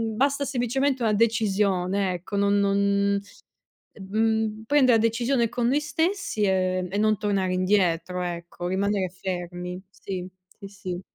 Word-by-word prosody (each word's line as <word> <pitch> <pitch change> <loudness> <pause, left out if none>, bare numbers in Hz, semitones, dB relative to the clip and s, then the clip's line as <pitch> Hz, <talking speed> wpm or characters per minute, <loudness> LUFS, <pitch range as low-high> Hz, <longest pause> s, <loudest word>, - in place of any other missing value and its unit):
basta 280 +3 +1
semplicemente 265 +1 0
una 220 -2 +2
decisione, 200 -4 +1
ecco, 180 +3 -6
non 200 0 +3
non 200 0 +2 0.7
mhmm, 220 +2 -1
prendere 260 -4 +5
la 220 - 0
decisione 235 +1 +1
con 235 0 -1
noi 275 +4 +3
stessi, 325 - -1
ehm, 185 -1 +1
e 200 - -2
non 215 0 +3
tornare 195 -2 0
indietro 180 -2 +1
ecco, 175 0 -5
rimanere 195 0 0
fermi. 180 0 -5
Sì, 185 -2 -6 0.3
sì, 200 - -8
sì. 185 -2 -6
200 Hz, 135 wpm, -25 LUFS, 185-230 Hz, 0.7 s, prendere